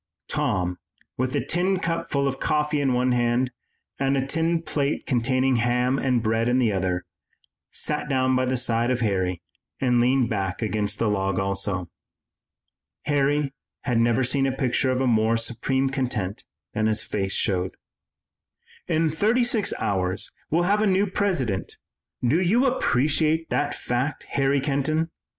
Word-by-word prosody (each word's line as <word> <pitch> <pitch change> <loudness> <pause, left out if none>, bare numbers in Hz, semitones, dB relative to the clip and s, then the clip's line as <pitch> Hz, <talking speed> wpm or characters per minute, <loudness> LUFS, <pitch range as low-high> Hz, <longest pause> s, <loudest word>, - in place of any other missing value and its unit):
Tom, 90 -1 -1 0.4
with 130 +1 -1
a - - 0
tin 185 +3 +1
cup 165 -1 -2
full 140 -1 +1
of 135 - -3
coffee 150 -1 +1
in 135 -2 +2
one 125 +1 +2
hand 120 +1 +1 0.5
and 135 0 +1
a 135 - 0
tin 165 +3 0
plate 145 -2 -1
containing 130 0 +2
ham 125 +3 +1
and 125 -4 +1
bread 115 +1 +1
in 125 - +3
the 120 -4 +3
other, 90 -2 -1 0.6
sat 150 0 -2
down 130 -1 +2
by 130 - +2
the 130 0 0
side 120 -1 +1
of 125 -1 0
Harry 95 -5 0 0.4
and 125 -2 +3
leaned 125 0 +3
back 95 -3 -2
against 105 -2 -1
the 115 - 0
log 95 -2 0
also. 95 -1 -1 1.2
Harry 145 0 +1 0.3
had 125 -4 +1
never 120 +2 +3
seen 135 +2 +1
a - - +1
picture 130 0 0
of 130 0 +1
more 115 -1 +3
supreme 130 +4 -1
content 125 -8 -2 0.3
than 110 0 +1
his 110 0 0
face 95 -2 -2
showed. 95 -2 -1 1.1
"In 160 -1 +1
thirty 220 +10 +2
six 235 -3 0
hours 95 -2 -1 0.2
we'll 170 +3 +2
have 205 +4 +2
a 215 - +3
new 195 +1 +3
President, 175 - -1 0.5
do 155 +9 +3
you 225 +9 +3
appreciate 160 - +1
that 145 0 0
fact, 130 +4 -2
Harry 140 0 +2
Kenton?" 155 +4 0
130 Hz, 155 wpm, -24 LUFS, 115-150 Hz, 1.2 s, in